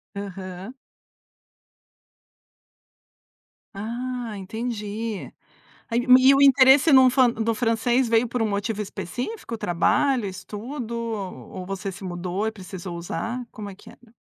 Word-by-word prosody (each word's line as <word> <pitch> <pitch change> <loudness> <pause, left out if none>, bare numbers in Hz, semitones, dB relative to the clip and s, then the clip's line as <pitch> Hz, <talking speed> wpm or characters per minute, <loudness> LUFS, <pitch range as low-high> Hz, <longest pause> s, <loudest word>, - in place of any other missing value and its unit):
Aham. 195 +1 -7 3.0
Ah, 235 +3 -4
entendi. 215 +1 -5 0.6
Aí 235 0 +1 0.2
e 260 +1 +6
o 275 - +4
interesse 270 +2 +7
num 260 -1 +8
fan 255 -1 +4
do 225 0 -1
francês 235 +2 +1
veio 230 +1 +3
por 235 0 -2
um 220 - +1
motivo 210 +1 -2
específico, 240 - -5
trabalho, 215 - +1
estudo, 220 +6 -6
ou 205 -5 -5
você 195 +1 -4
se 185 - -11
mudou 180 +2 -3
e - - 0
precisou 185 -3 -8
usar? 225 +9 -4
Como 205 -2 -7
é - - -10
que - - -16
era? 235 -1 -21
225 Hz, 120 wpm, -24 LUFS, 195-245 Hz, 3.0 s, num